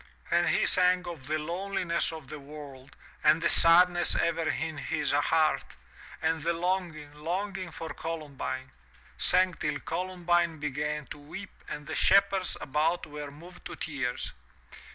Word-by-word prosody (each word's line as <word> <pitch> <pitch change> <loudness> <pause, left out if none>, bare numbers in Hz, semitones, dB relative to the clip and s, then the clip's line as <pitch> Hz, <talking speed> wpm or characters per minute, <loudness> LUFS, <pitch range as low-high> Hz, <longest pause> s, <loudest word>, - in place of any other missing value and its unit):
And 170 0 +3
he - - +2
sang 180 0 +4
of 155 -7 -8
the 155 +1 0
loneliness 175 +2 -1
of 160 -4 -9
the 150 +2 -8
world 140 -2 -11 0.3
and 160 - +5
the - - +2
sadness 175 +1 +7
ever 165 -1 0
in 160 +1 -3
his 155 -2 -1
heart, 155 +2 +1 0.5
and 160 0 +1
the 170 +2 0
longing, 170 -4 -2
longing 185 +4 -4
for 160 0 -7
Colum 160 -3 -6
bine 130 -1 -5 0.3
— - - -27
sang 185 0 +4
till 150 -3 -3
Columbine 175 -1 0
began 150 +1 -3
to - - -14
weep 175 +7 -9 0.2
and 150 0 -6
the - - -6
shepherds 195 -1 +3
about 155 +5 0
were 150 -1 -7
moved 170 +5 -14
to - - -6
tears. 140 -5 -3
165 Hz, 155 wpm, -29 LUFS, 150-175 Hz, 0.5 s, sadness